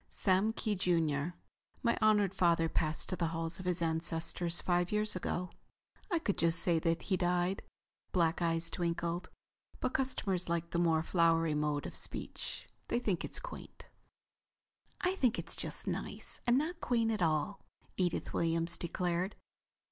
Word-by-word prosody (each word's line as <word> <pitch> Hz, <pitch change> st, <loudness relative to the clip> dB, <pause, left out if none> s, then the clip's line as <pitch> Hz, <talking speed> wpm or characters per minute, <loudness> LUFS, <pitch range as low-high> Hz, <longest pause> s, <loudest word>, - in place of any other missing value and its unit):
"Sam 195 Hz, +3 st, +2 dB
Kee, 215 Hz, -1 st, -1 dB
junior. 165 Hz, -4 st, +1 dB, 0.5 s
My 235 Hz, -, +3 dB
honored 210 Hz, -3 st, +4 dB
father 170 Hz, -3 st, +3 dB
passed 155 Hz, -1 st, 0 dB
to 185 Hz, -, 0 dB
the 170 Hz, -2 st, 0 dB
halls 165 Hz, +1 st, -2 dB
of 185 Hz, -, -5 dB
his 175 Hz, -1 st, +1 dB
ancestors 165 Hz, +1 st, +1 dB
five 175 Hz, 0 st, +1 dB
years 210 Hz, -1 st, +1 dB
ago. 180 Hz, 0 st, -2 dB, 0.6 s
I 350 Hz, -, +2 dB
could 215 Hz, -11 st, -1 dB
just 165 Hz, 0 st, +4 dB
say 170 Hz, -2 st, +3 dB
that 165 Hz, 0 st, 0 dB
he 190 Hz, -, +1 dB
died—" 180 Hz, +1 st, +1 dB, 0.5 s
black 170 Hz, -1 st, +2 dB
eyes 165 Hz, 0 st, +1 dB
twinkled—"but 175 Hz, +8 st, -4 dB
customers 195 Hz, -9 st, 0 dB
like 170 Hz, 0 st, -1 dB
the 170 Hz, -, +1 dB
more 165 Hz, -2 st, +3 dB
flowery 165 Hz, -2 st, +3 dB
mode 150 Hz, -1 st, 0 dB
of -, -, -6 dB
speech. -, -, -5 dB, 0.2 s
They -, -, +1 dB
think 205 Hz, -8 st, 0 dB
it's -, -, -3 dB
quaint." -, -, -9 dB, 1.1 s
"I 365 Hz, +1 st, +2 dB
think 250 Hz, -, +3 dB
it's -, -, -4 dB
just -, -, -4 dB
nice, -, -, -4 dB
and 240 Hz, +1 st, +5 dB
not 330 Hz, +5 st, -1 dB
quaint 230 Hz, -2 st, +2 dB
at 215 Hz, -3 st, -1 dB
all," 165 Hz, +4 st, +1 dB, 0.3 s
Edith 180 Hz, -2 st, -1 dB
Williams 165 Hz, 0 st, +1 dB
declared. 180 Hz, +2 st, -1 dB
175 Hz, 155 wpm, -34 LUFS, 165-200 Hz, 1.1 s, and